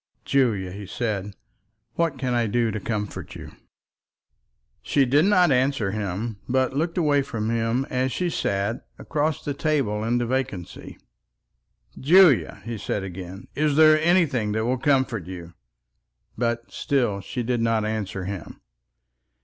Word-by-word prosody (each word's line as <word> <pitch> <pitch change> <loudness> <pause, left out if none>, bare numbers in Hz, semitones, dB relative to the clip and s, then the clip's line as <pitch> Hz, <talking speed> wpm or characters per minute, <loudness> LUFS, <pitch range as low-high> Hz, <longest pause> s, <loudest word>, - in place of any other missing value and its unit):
"Julia," 110 -9 +1
he 100 +1 -8
said, 105 -2 -3 0.6
"what 165 -5 0
can 130 -1 -1
I 120 -2 +1
do 115 +1 +1
to 110 - -3
comfort 105 0 -4
you?" - - -9 1.3
She 140 -2 +2
did 145 +6 +3
not 180 -5 +4
answer 130 -5 +1
him, 105 +2 -3
but 130 +1 +1
looked 165 +4 -1
away 150 -4 +3
from 115 -4 -3
him 115 +3 0
as 130 +1 -1
she 180 +4 -1
sat, 100 -1 -1
across 155 0 -2
the 145 - -1
table 135 -8 0
into 120 +2 +1
vacancy. 120 -8 -4 1.0
"Julia," 165 -1 +5
he 115 -2 -5
said 100 0 -2
again, 95 0 -8
"is 150 -1 +1
there 155 0 +6
anything 150 - +2
that 110 +1 0
will 125 +1 0
comfort 130 - +1
you?" 85 -2 -8 0.8
But 120 0 -2
still 120 -8 0
she 120 +5 -4
did 120 0 -1
not 115 -2 +1
answer 105 -3 -3
him. 95 -2 -7
120 Hz, 140 wpm, -24 LUFS, 105-140 Hz, 1.3 s, there